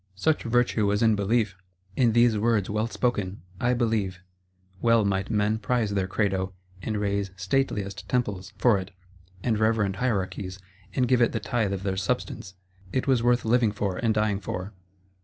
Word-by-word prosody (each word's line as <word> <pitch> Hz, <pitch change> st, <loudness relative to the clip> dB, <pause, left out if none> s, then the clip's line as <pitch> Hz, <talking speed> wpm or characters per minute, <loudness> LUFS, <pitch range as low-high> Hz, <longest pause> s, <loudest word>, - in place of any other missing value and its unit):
Such 155 Hz, -, +1 dB
virtue 115 Hz, -3 st, +1 dB
was 105 Hz, +2 st, +1 dB
in 110 Hz, -1 st, +5 dB
Belief; 105 Hz, 0 st, +1 dB, 0.4 s
in 120 Hz, -4 st, +3 dB
these 120 Hz, -1 st, +5 dB
words, 105 Hz, -2 st, +1 dB
well 110 Hz, +2 st, 0 dB
spoken: 105 Hz, -6 st, -2 dB, 0.2 s
I 125 Hz, +1 st, +2 dB
believe. 110 Hz, -6 st, 0 dB, 0.6 s
Well 115 Hz, -2 st, +4 dB
might 95 Hz, -1 st, 0 dB
men 105 Hz, 0 st, +1 dB
prize 115 Hz, -1 st, 0 dB
their 95 Hz, -2 st, 0 dB
Credo, 95 Hz, -2 st, -1 dB, 0.3 s
and 110 Hz, +1 st, -2 dB
raise 100 Hz, -1 st, -1 dB
stateliest 100 Hz, 0 st, -1 dB
Temples 100 Hz, -6 st, -1 dB
for 105 Hz, -1 st, +4 dB
it, 95 Hz, 0 st, -7 dB, 0.5 s
and 110 Hz, -3 st, +1 dB
reverend 110 Hz, -3 st, +1 dB
Hierarchies, 95 Hz, -5 st, -2 dB, 0.4 s
and 125 Hz, -1 st, +2 dB
give 125 Hz, 0 st, +3 dB
it 120 Hz, -, +3 dB
the -, -, 0 dB
tithe 115 Hz, -5 st, -1 dB
of 95 Hz, -1 st, -3 dB
their 95 Hz, -1 st, -1 dB
substance; 95 Hz, 0 st, -3 dB, 0.4 s
it 130 Hz, -, 0 dB
was 130 Hz, -4 st, +3 dB
worth 120 Hz, 0 st, +2 dB
living 115 Hz, -1 st, +3 dB
for 100 Hz, -3 st, -2 dB
and 115 Hz, -, +1 dB
dying 105 Hz, -2 st, +1 dB
for. 95 Hz, +1 st, -5 dB
105 Hz, 170 wpm, -26 LUFS, 100-120 Hz, 0.6 s, in